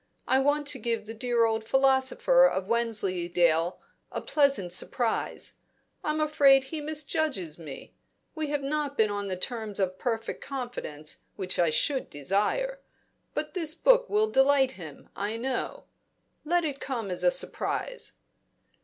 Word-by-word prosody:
I 260 - +4
want 290 +2 +2
to 265 - -2
give 230 -2 -2
the 225 - -7
dear 235 0 +1
old 225 0 0
philosopher 270 - +4
of 190 - -2
Wensleydale 180 -7 +1 0.3
a - - -3
pleasant 275 - +2
surprise. 230 +5 -1 0.5
I'm 305 0 0
afraid 285 -3 +5
he 300 +3 -5
misjudges 295 - -2
me; 150 -5 -9 0.4
we 315 -2 -2
have 290 -1 -2
not 285 0 -2
been 215 -2 +3
on 205 0 -3
the 185 -1 -3
terms 220 0 -2
of 185 -1 -1
perfect 225 -2 -3
confidence 245 - -6 0.2
which 185 -3 -3
I 170 -2 +4
should 265 - +1
desire. 210 - 0 0.6
But - - -3
this 325 -4 -1
book - - +4
will 430 +1 +2
delight 270 -2 +4
him, 160 - -11
I 210 +3 -2
know. 255 +2 -3 0.6
Let 345 +2 +1
it 280 -3 -3
come 230 -8 -4
as 180 - -2
a - - +6
surprise." - - -2
250 Hz, 145 wpm, -28 LUFS, 200-295 Hz, 0.6 s, a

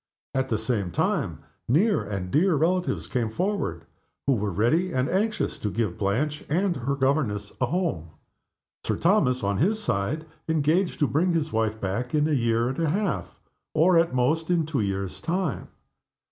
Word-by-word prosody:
At 130 0 0
the 110 - +1
same 110 -4 -1
time, 85 - -1 0.2
near 195 - +3
and 95 -3 -4
dear 175 +3 +3
relatives 175 +4 +1
came 120 -3 -1
forward, 170 - -2 0.4
who 140 - +4
were 105 -3 -1
ready 120 - +1
and 130 -2 0
anxious 210 +3 0
to 105 - -2
give 105 -4 -2
Blanche 140 +10 0
and 180 +4 +1
her 135 +1 -1
governess 130 -7 0
a 125 - +3
home 120 - -1 0.7
Sir - - 0
Thomas, 150 - +2
on 100 0 0
his 205 - +2
side, 155 - -1 0.2
engaging 160 +4 +2
to 145 - +2
bring 170 +6 +1
his 160 -2 0
wife 110 -1 0
back 115 +8 -2
in 150 0 +3
a - - -1
year 115 -4 +2
and 130 - -4
a 165 -2 +1
half, 195 0 -2 0.4
or, 170 +4 +5
at 165 0 +4
most, 155 +7 +1
in 170 -3 +2
two 145 -6 -1
years' 100 -2 -3
time. 170 -3 -2
140 Hz, 175 wpm, -26 LUFS, 110-170 Hz, 0.7 s, or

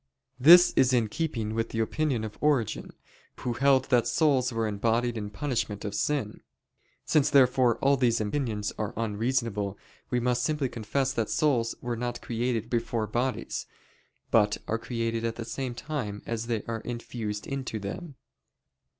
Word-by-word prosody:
This 175 +6 +8
is 130 -1 +4
in 115 -4 +2
keeping 115 -6 -2
with 115 0 -1
the - - -5
opinion 125 +1 0
of 110 -1 -6
Origen, 145 -7 +1 0.5
who 125 - -1
held 130 +1 +3
that 120 -2 +4
souls 135 -5 +2
were 115 -1 -1
embodied 115 +3 0
in 105 -2 -4
punishment 105 -3 -3
of 105 - -3
sin. 110 0 -1 0.6
Since, 150 -3 +3
therefore, 125 -3 +4
all 140 0 +4
these 120 -3 +2
opinions 105 -2 -2
are 105 0 -3
unreasonable, 110 -2 -1 0.3
we 125 - +1
must 125 0 +1
simply 150 -4 0
confess 130 +4 -1
that 115 -5 -1
souls 125 -7 +1
were 120 -1 -2
not 120 +1 -3
created 115 -1 -2
before 115 -1 -1
bodies, 120 +4 -2 0.6
but 105 -2 +4
are 115 - -1
created 115 -1 -2
at 115 -1 -1
the 115 - -6
same 130 0 -4
time 120 -9 -4
as 115 0 -3
they 115 -3 -1
are 115 -1 -4
infused 115 -4 -5
into 135 -5 -4
them. 135 - -6
120 Hz, 160 wpm, -28 LUFS, 110-130 Hz, 0.6 s, This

